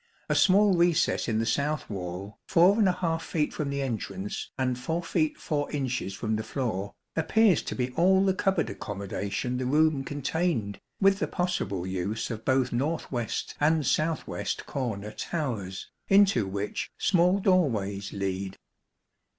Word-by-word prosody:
A - - +3
small 200 0 +5
recess 170 -1 +2
in 110 -2 0
the 115 - +1
south 140 +6 0
wall, 95 0 -6
4 180 -2 +3
feet 155 -2 -1
from 150 -2 -2
the 140 0 -1
entrance, 110 -5 -4
and 125 -2 0
4 165 +7 -2
feet 155 -2 0
4 145 -2 -2
inches 130 -8 -2
from 110 +2 -1
the 110 - -3
floor, 110 -5 -3 0.2
appears 185 +3 +3
to - - -5
be 125 0 -1
all 190 +6 +4
the 190 - +3
cupboard 190 -3 0
accommodation 100 +4 -3
the 125 0 -2
room 150 0 +3
contained, 145 - -1 0.2
with 195 0 +4
the - - 0
possible 100 - -2
use 95 +5 -2
of 110 -1 -5
both 130 0 +1
north 150 +7 -1
west 120 -4 -3
and 155 0 +3
south 155 +5 +1
west - - -4
corner 110 -6 -3
towers, 110 - -4 0.2
into 195 - +4
which 100 +2 -3
small 180 0 +3
doorways 115 - +1
lead. 95 0 -3
135 Hz, 150 wpm, -28 LUFS, 105-170 Hz, 0.2 s, small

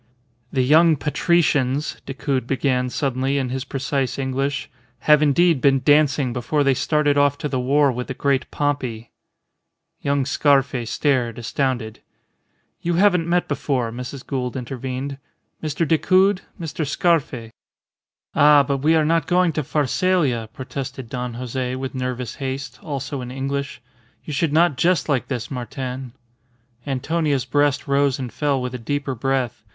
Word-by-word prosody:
"The 130 - +1
young 160 +4 +5
patricians," 150 -2 +1
Decoud 135 -2 -2
began 125 -1 0
suddenly 135 +1 -1
in 130 -2 -1
his 130 +1 -3
precise 135 -1 -2
English, 135 +1 -2 0.3
"have 150 -1 +5
indeed 155 0 +3
been 135 -1 +3
dancing 145 -4 +3
before 130 +5 0
they 135 -1 +3
started 145 +1 +2
off 145 0 +3
to 150 - -3
the 130 -3 -2
war 140 +2 +3
with 125 0 -4
the 135 - -5
Great 140 -1 0
Pompey." 130 -6 -2 0.9
Young 140 -1 +1
Scarfe 140 -4 +2
stared, 120 -2 0
astounded. 120 -1 -2 0.8
"You 175 0 0
haven't 180 -3 +3
met 175 +1 +2
before," 125 -5 -1
Mrs. 125 +3 -7
Gould 130 -2 -3
intervened. 130 +2 -5 0.4
"Mr. 155 +1 -1
Decoud 185 +4 +3 0.2
Mr. 165 -1 -3
Scarfe." 140 -8 0 0.8
"Ah! 145 0 +6
But 140 +1 -1
we 155 +4 +3
are 155 -1 +3
not 165 0 +1
going 180 -2 +3
to 155 - -1
Pharsalia," 145 - +1
protested 130 0 -6
Don 125 -1 -4
Jose, 125 +1 -3
with 130 0 -5
nervous 125 -2 -3
haste, 135 0 -4
also 140 -2 -4
in 125 - -6
English. 135 0 -4 0.4
"You 150 - -5
should 150 +2 0
not 165 -2 +3
jest 175 -1 +2
like 140 -5 0
this, 120 -2 -4
Martin." 130 0 -5 0.7
Antonia's 145 0 0
breast 145 -1 +1
rose 140 -1 +2
and 125 -5 -6
fell 145 0 0
with 125 0 -4
a 125 - -5
deeper 140 +3 -2
breath. 125 -3 -2
135 Hz, 145 wpm, -22 LUFS, 125-150 Hz, 0.9 s, Ah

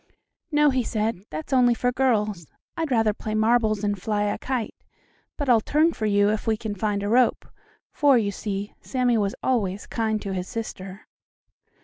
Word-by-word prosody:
"No," 295 -1 +4
he 260 -1 +1
said, 215 -3 -2
"that's 155 +10 -5
only 245 -2 +4
for 245 +1 0
girls. 210 - 0 0.3
I'd 325 -2 -2
rather 225 -4 +2
play 215 0 -5
marbles 220 -1 +2
and 205 -2 -1
fly 210 0 0
a 205 0 -1
kite, 255 -4 -3 0.6
but 285 - -3
I'll 235 -3 +5
turn 310 +7 +2
for 215 - -2
you, 205 0 +3
if 215 +1 -3
we 220 -1 +2
can 215 -1 -4
find 205 0 -2
a - - -1
rope," 240 +3 +2 0.5
for, 280 -3 +4
you 205 -3 0
see, 200 0 -5
Sammie 250 -3 +1
was 200 -1 -1
always 205 -6 0
kind 220 -2 -1
to 195 - -4
his 180 0 -3
sister. 195 -4 -6
220 Hz, 185 wpm, -24 LUFS, 205-245 Hz, 0.6 s, I'll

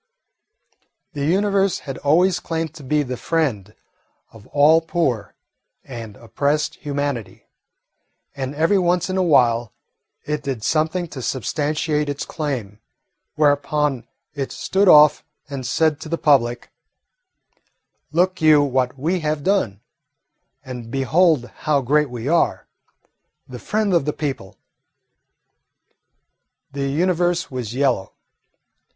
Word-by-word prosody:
The 140 -2 -3
Universe 195 +1 +1
had 135 -2 -6
always 175 +5 +3
claimed 165 -3 -4
to 155 -2 -12
be 150 +3 +1
the 125 -2 -5
friend 115 - -2 0.6
of 110 -2 -16
all 150 +3 +4
poor 135 - -2 0.5
and 115 -5 -9
oppressed 145 +6 -1
humanity, 145 -6 -4 0.9
and 135 0 -4
every 165 +6 +2
once 180 0 +1
in 190 - -1
a - - +2
while 120 -9 +3 0.5
it 150 0 -2
did 135 -6 -4
something 160 +6 0
to 135 - -7
substantiate 150 +4 -1
its 145 0 -4
claim, 125 -10 -4 0.6
whereupon 145 -2 +1 0.3
it 140 -2 -4
stood 195 +1 0
off 150 -3 +7 0.2
and 135 -3 -5
said 155 +2 +1
to 155 - -8
the 170 - -1
public, 120 -6 +1 1.4
"Look 180 +3 +1
you 155 -2 +6
what 130 -1 -1
we 165 +7 -1
have 155 -2 -2
done, 145 - 0 0.8
and 125 -3 -8
behold 140 +2 +2 0.2
how 145 -2 +4
great 150 +3 +2
we 120 0 -6
are, 170 +2 +1 0.8
the 125 -1 -9
friend 210 - -1
of 170 -6 +2
the 150 - -1
people!" 135 -10 -5 2.1
The 140 0 -3
Universe 175 +3 0
was 125 -3 -5
yellow. 130 -8 0
145 Hz, 120 wpm, -21 LUFS, 130-165 Hz, 2.1 s, off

